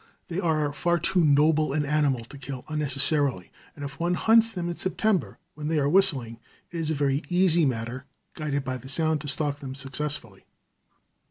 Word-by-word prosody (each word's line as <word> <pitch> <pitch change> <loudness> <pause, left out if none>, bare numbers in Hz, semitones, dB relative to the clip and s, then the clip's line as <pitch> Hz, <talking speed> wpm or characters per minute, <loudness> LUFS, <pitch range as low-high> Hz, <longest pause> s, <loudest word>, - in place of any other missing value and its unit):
They 170 +2 -2
are 155 -5 0
far 175 +3 +1
too 170 +2 +2
noble 150 0 +3
an 150 0 0
animal 140 -5 +1
to 140 - -12
kill 135 -1 -7
unnecessarily, 145 - +1 0.2
and 145 - -6
if 140 0 -9
one 175 +1 +1
hunts 225 +3 +4
them 180 -6 -4
in 175 - -3
September, 185 +1 -1 0.2
when 150 0 -6
they 160 0 0
are 140 -1 +2
whistling, 145 -10 +2 0.3
it 170 - -4
is 160 -1 -1
a 160 - 0
very 140 0 +1
easy 175 -3 +3
matter, 125 +2 -4 0.3
guided 145 -3 -2
by 130 -1 -3
the 130 +1 -12
sound, 155 +1 0
to 150 - -7
stalk 145 0 0
them 135 -2 -7
successfully. 135 -6 -5
150 Hz, 185 wpm, -26 LUFS, 135-165 Hz, 0.3 s, hunts